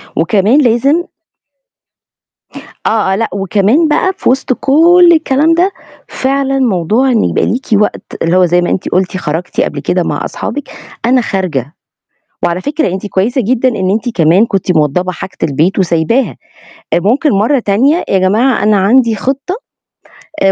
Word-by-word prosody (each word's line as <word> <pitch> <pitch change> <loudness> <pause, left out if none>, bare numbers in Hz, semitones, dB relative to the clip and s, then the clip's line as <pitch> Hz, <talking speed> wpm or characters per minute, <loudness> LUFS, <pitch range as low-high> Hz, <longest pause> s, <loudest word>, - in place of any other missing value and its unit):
وكمان 205 - +2
لازم 275 +7 +2 1.8
آه، 215 -3 +1
آه، - - +1
لأ 225 +3 -2
وكمان 200 - +1
بقى 320 +5 +1
في - - 0
وِسْط 260 0 0
كُلّ 340 +7 +4
الكلام 310 0 +2
ده، 355 +4 +1 0.4
فعلًا 270 0 -1
موضوع 230 +2 +1
إن 225 -4 +2
يبقى - - 0
ليكِ 255 +3 -2
وقت 210 0 +1 0.2
اللي 165 +2 +1
هو 185 - +4
زي 175 +1 +2
ما 175 - -1
أنتِ 185 - -2
قُلتِ 185 0 -1
خرجتِ 165 0 -3
قبل - - -2
كده - - -1
مع - - -3
أصحابِك، 290 - -5 0.4
أنا 250 +2 +3
خارجة، 170 - -3 0.7
وعلى 175 +1 0
فكرة 300 +7 -1
أنتِ 190 +2 -5
كويسة 215 +7 0
جدًا 250 +3 0
إن 190 -6 -2
أنتِ 220 +5 -1
كمان 170 +6 +4
كنتِ 195 -4 -1
موضَّبة 155 +5 0
حاجة 185 +1 -9
البيت 160 +7 0
وسايباها، 185 +8 0 0.6
ممكن 235 - +1
مرّه 230 +6 +1
تانية 255 - +1
يا 195 - +2
جماعة 215 +6 +1
أنا 210 0 +3
عندي 225 +4 +3
خِطَّة، 275 - -3 0.9
آآ، 195 - +4
220 Hz, 155 wpm, -12 LUFS, 185-270 Hz, 1.8 s, كُلّ